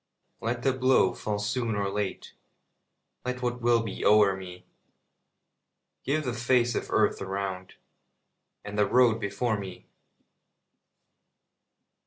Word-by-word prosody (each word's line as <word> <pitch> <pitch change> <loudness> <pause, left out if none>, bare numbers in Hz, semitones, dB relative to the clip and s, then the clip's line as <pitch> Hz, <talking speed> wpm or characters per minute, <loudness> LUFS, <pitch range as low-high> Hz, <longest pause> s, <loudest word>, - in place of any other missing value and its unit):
Let 120 +1 -3
the 135 - +2
blow 130 -7 +3
fall 105 -1 -3
soon 115 +2 -1
or 100 -1 -1
late, 100 0 -4 0.9
Let 125 0 -4
what 120 0 -2
will 120 -1 +3
be 110 - -5
o'er 105 -2 +5
me; 90 -1 -10 1.4
Give 155 +3 0
the 125 - -1
face 120 0 +2
of - - -3
earth - - +2
around, 95 -1 -4 0.9
And 105 0 -4
the 105 - +4
road 120 -3 +4
before 110 +1 -1
me. 95 -2 -9
110 Hz, 120 wpm, -27 LUFS, 100-125 Hz, 1.4 s, o'er